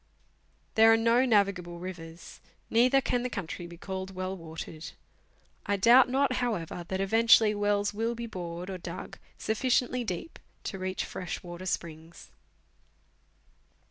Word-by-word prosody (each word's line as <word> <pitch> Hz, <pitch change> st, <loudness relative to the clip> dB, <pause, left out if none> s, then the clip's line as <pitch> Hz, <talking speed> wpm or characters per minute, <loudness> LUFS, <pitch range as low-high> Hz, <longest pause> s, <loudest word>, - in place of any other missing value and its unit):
There 225 Hz, 0 st, +7 dB
are 225 Hz, -, +6 dB
no 230 Hz, +3 st, +3 dB
navigable 200 Hz, -6 st, +1 dB
rivers; 170 Hz, -2 st, -9 dB, 0.3 s
neither 250 Hz, +4 st, +5 dB
can 245 Hz, -1 st, 0 dB
the 250 Hz, -, -2 dB
country 180 Hz, -5 st, -5 dB
be 170 Hz, 0 st, -11 dB
called 190 Hz, +1 st, -6 dB
well 185 Hz, +1 st, -3 dB
watered. 160 Hz, -2 st, -8 dB, 0.7 s
I 200 Hz, -, +2 dB
doubt 245 Hz, +6 st, +6 dB
not, 265 Hz, 0 st, +1 dB
however, 180 Hz, -8 st, -2 dB
that 190 Hz, -, -2 dB
eventually 225 Hz, +2 st, +5 dB
wells 205 Hz, 0 st, 0 dB
will 225 Hz, +3 st, -1 dB
be 235 Hz, 0 st, -5 dB
bored 180 Hz, -3 st, -6 dB
or 185 Hz, -, -5 dB
dug 170 Hz, +1 st, -8 dB, 0.2 s
sufficiently 250 Hz, +2 st, 0 dB
deep 200 Hz, -, -5 dB, 0.2 s
to 195 Hz, -, -5 dB
reach 185 Hz, 0 st, -2 dB
fresh 180 Hz, -2 st, -6 dB
water 175 Hz, +1 st, -7 dB
springs. 165 Hz, -1 st, -5 dB
195 Hz, 140 wpm, -29 LUFS, 175-230 Hz, 0.7 s, There